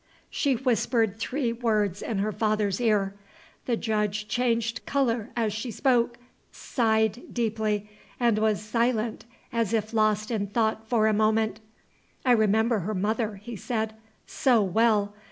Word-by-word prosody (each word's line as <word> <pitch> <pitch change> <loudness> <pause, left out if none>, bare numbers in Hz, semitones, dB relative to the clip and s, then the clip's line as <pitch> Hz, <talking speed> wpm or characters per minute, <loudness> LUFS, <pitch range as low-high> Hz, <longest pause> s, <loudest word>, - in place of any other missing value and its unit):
She 280 -3 +1
whispered 225 -3 +1
three 250 0 -1
words 215 -5 0
in 220 - -3
her 205 +2 0
father's 210 -1 0
ear. 205 -4 +2 0.5
The 235 -2 +1
Judge 210 -2 -1
changed 235 -1 0
color 245 -5 0
as 225 -3 0
she 220 +4 -4
spoke, 240 0 +1 0.3
sighed 220 -1 0
deeply, 215 -3 -1 0.3
and 235 -3 +3
was 215 -1 +1
silent 225 0 0 0.3
as 230 -2 0
if 220 0 -1
lost 215 0 +1
in 205 -3 -1
thought 220 +1 0
for 225 -3 +3
a 220 - +3
moment. 220 +1 +1 0.7
"I 255 - +4
remember 220 0 +3
her 205 +4 -3
mother," 215 +2 -1
he 215 +4 -8
said, 220 +1 -2 0.3
"so 250 -4 +2
well! 205 +1 +2
220 Hz, 140 wpm, -26 LUFS, 210-235 Hz, 0.7 s, I